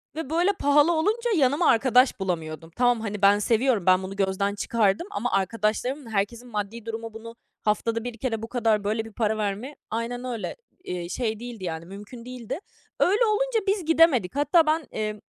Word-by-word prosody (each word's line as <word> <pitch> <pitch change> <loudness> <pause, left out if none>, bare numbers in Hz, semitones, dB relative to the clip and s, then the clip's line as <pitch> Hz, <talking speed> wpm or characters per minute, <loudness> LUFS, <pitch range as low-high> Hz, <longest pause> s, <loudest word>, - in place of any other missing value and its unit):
ve 320 -3 -5
böyle 350 +5 +2
pahalı 290 +1 +4
olunca 425 +9 +1
yanıma 290 +3 +3
arkadaş 250 +2 +4
bulamıyordum. 165 -3 -4
Tamam, 245 -2 +2
hani, 210 -2 -4
ben 200 +1 +6
seviyorum, 230 -2 +2
ben 185 0 +4
bunu 195 +1 -6
gözden 200 +1 0
çıkardım 215 - +1
ama 245 +4 -2
arkadaşlarımın, 225 +6 -1
herkesin 225 +4 -2
maddi 210 +1 -4
durumu 225 0 -5
bunu 230 +1 -9 0.3
haftada 225 +2 0
1 245 -2 -6
kere 225 -2 -2
bu 225 - -5
kadar 225 -3 +1
böyle 220 +2 -1
bir 225 - -10
para 220 -1 0
vermeye 215 +7 -3
Aynen 235 +2 -3
öyle, 240 -4 -4 0.3
eee, 175 - -5
şey 220 +1 -2
değildi 235 -4 -8
yani, 165 -1 -4
mümkün 205 +5 -10
değildi. 250 - -6 0.4
Öyle 415 +6 +4
olunca 455 +2 +1
biz 390 -4 +1
gidemedik. 315 - +4
Hatta 295 +3 +4
ben, 315 -3 +1
emm, 215 -1 -3
230 Hz, 175 wpm, -25 LUFS, 205-270 Hz, 0.4 s, ben